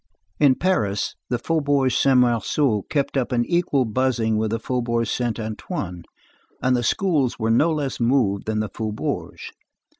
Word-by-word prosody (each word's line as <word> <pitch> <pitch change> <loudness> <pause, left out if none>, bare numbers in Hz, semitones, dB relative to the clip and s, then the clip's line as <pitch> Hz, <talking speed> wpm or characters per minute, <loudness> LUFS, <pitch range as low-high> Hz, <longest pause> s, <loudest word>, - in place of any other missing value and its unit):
In 140 -3 +5
Paris, 105 - 0 0.2
the 125 - 0
Faubourg 145 -1 +1
Saint 135 +2 +3
Marceau 120 -1 +1
kept 140 -2 -1
up 135 -1 0
an 120 -1 +1
equal 170 -7 +1
buzzing 115 -1 0
with 110 0 0
the 115 - -1
Faubourg 120 0 -1
Saint 120 +1 -2
Antoine, 105 - -5 0.5
and 130 0 +2
the 120 - 0
schools 145 -1 +1
were 110 -1 0
no 150 +9 +3
less 145 -4 -2
moved 115 -6 +1
than 110 -1 0
the 110 - -3
faubourgs. 110 +1 -4
120 Hz, 155 wpm, -22 LUFS, 110-140 Hz, 0.5 s, In